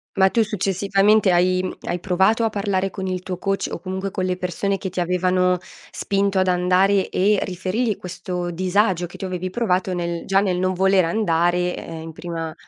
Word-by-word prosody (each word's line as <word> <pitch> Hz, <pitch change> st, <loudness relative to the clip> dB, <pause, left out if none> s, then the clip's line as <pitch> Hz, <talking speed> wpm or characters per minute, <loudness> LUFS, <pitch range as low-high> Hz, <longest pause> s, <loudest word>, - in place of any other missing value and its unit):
Ma 190 Hz, -1 st, +5 dB
tu 230 Hz, +3 st, +2 dB
successivamente 200 Hz, 0 st, +2 dB
hai 185 Hz, +1 st, +2 dB
hai 175 Hz, -, -1 dB
provato 190 Hz, +5 st, +2 dB
a 225 Hz, -, +2 dB
parlare 195 Hz, -2 st, -1 dB
con 190 Hz, -1 st, -5 dB
il 185 Hz, -1 st, -3 dB
tuo 180 Hz, -1 st, -5 dB
coach 195 Hz, 0 st, -1 dB
o -, -, -4 dB
comunque 190 Hz, +2 st, -4 dB
con 185 Hz, -2 st, -2 dB
le 180 Hz, -1 st, -1 dB
persone 185 Hz, +2 st, -2 dB
che 190 Hz, -, -5 dB
ti 185 Hz, -, -4 dB
avevano 180 Hz, +1 st, +2 dB, 0.3 s
spinto 200 Hz, 0 st, 0 dB
ad 185 Hz, 0 st, +2 dB
andare 185 Hz, +2 st, +2 dB
e 200 Hz, +2 st, +2 dB
riferirgli 190 Hz, +5 st, -2 dB
questo 180 Hz, 0 st, -5 dB
disagio 185 Hz, 0 st, +1 dB
che 170 Hz, -, -12 dB
tu -, -, -5 dB
avevi 185 Hz, 0 st, -3 dB
provato 185 Hz, -3 st, 0 dB
nel 170 Hz, -1 st, -3 dB
già 195 Hz, 0 st, +4 dB
nel 190 Hz, -3 st, 0 dB
non 185 Hz, 0 st, +1 dB
voler 190 Hz, 0 st, +3 dB
andare, 175 Hz, -1 st, +1 dB
ehm, 165 Hz, -1 st, -7 dB
in 165 Hz, -, -7 dB
prima 165 Hz, -1 st, -5 dB
185 Hz, 190 wpm, -22 LUFS, 180-195 Hz, 0.3 s, Ma